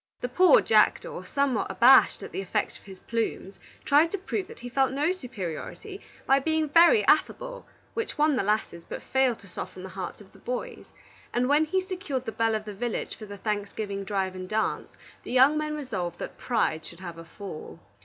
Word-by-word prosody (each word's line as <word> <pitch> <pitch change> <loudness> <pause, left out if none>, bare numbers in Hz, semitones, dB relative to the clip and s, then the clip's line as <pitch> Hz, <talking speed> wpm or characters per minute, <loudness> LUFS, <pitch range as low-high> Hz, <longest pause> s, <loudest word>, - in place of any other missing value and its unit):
The 245 - -3
poor 370 - +6
jackdaw, - - +2
somewhat 275 -6 0
abashed 260 +3 +6
at - - -8
the - - -3
effect 190 - -2
of - - -24
his 190 -1 -11
plumes, 225 -4 -3 0.3
tried 300 +4 +5
to 400 - -2
prove 375 0 -3
that - - -12
he 245 - -6
felt 265 +1 +1
no 290 +5 +1
superiority, 255 - -6 0.2
by 270 +1 +4
being 315 +2 0
very 345 - +6
affable, - - +1 0.3
which 455 - -3
won 300 -1 +3
the - - +1
lasses, 205 -4 -1
but - - -7
failed 265 -3 +2
to 195 - -14
soften 185 0 -7
the 190 - -7
hearts 185 -1 -6
of 205 -2 -16
the - - -17
boys; 250 0 -5 0.5
and 245 +1 +2
when 295 +3 +4
he 375 +5 0
secured 365 -9 -4
the 225 - -3
belle 225 0 +1
of 215 0 -3
the 210 - -6
village 235 +3 -3
for 215 - -10
the 200 0 -8
Thanksgiving 205 -1 -3
drive 195 -2 -1
and 185 0 -7
dance, 220 0 -1 0.3
the - - -8
young 260 +4 +6
men 305 0 -1
resolved 190 - -4
that - - -6
pride 210 -10 0
should 170 +1 -12
have 170 -2 -7
a 165 - -10
fall. 195 -6 -8
245 Hz, 205 wpm, -27 LUFS, 200-300 Hz, 0.5 s, poor